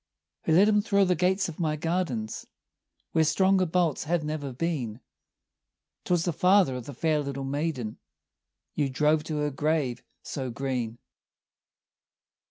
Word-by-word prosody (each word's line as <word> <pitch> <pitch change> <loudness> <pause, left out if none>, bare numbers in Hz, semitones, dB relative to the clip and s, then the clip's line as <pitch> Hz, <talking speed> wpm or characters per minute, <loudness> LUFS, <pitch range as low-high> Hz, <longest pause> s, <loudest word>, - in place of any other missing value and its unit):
"Who 160 - +2
let 190 +5 +6
him 210 -1 +4
thro' 200 -2 +3
the 180 - +3
gates 185 +3 +1
of 165 -1 -8
my 155 -3 0
gardens, 155 -9 -2 0.6
Where 160 - +3
stronger 190 +3 +3
bolts 165 -3 +1
have 170 +1 0
never 150 -2 -3
been?" 130 -6 -3 1.1
"'Twas 175 -2 +1
the 175 - 0
father 180 -4 +4
of 125 -1 -6
the 140 - -7
fair 155 +2 +1
little 140 -1 -4
maiden 135 -5 -3 0.7
You 145 -2 0
drove 150 +3 +2
to 155 -2 -3
her 150 0 0
grave 145 -3 0 0.2
so 130 -2 -4
green." 120 -2 -3
155 Hz, 145 wpm, -27 LUFS, 135-175 Hz, 1.1 s, let